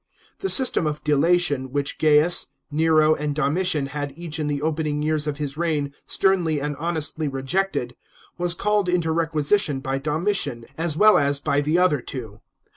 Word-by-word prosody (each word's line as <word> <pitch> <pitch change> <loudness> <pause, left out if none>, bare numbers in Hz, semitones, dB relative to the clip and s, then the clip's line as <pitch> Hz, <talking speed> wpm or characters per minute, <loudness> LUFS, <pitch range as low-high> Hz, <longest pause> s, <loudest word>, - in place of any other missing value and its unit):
The 390 - -2
system 255 - +4
of 150 0 -4
delation 150 -3 +1
which 140 0 -2
G 155 - +1
aius, 150 +3 +5 0.2
Nero, 155 0 +3
and 150 -1 -3
Domitian 155 +1 +1
had 145 0 -5
each 165 -2 -6
in 150 - -2
the 145 -1 -2
opening 155 -1 -2
years 155 -1 0
of 145 -1 -3
his 145 -1 -5
reign 150 -4 -1
sternly 175 -6 +1
and 145 +1 -3
honestly 160 -2 -2
rejected, 135 -1 -2 0.4
was 175 -1 0
called 205 0 0
into 170 -2 0
requisition 160 -1 0
by 135 0 -3
Domitian, 150 - -2
as 160 -1 -1
well 215 +2 +6
as 140 -1 +1
by 145 -1 0
the 155 +4 0
other 180 -7 +2
two. 110 -5 -8
155 Hz, 170 wpm, -22 LUFS, 145-170 Hz, 0.4 s, well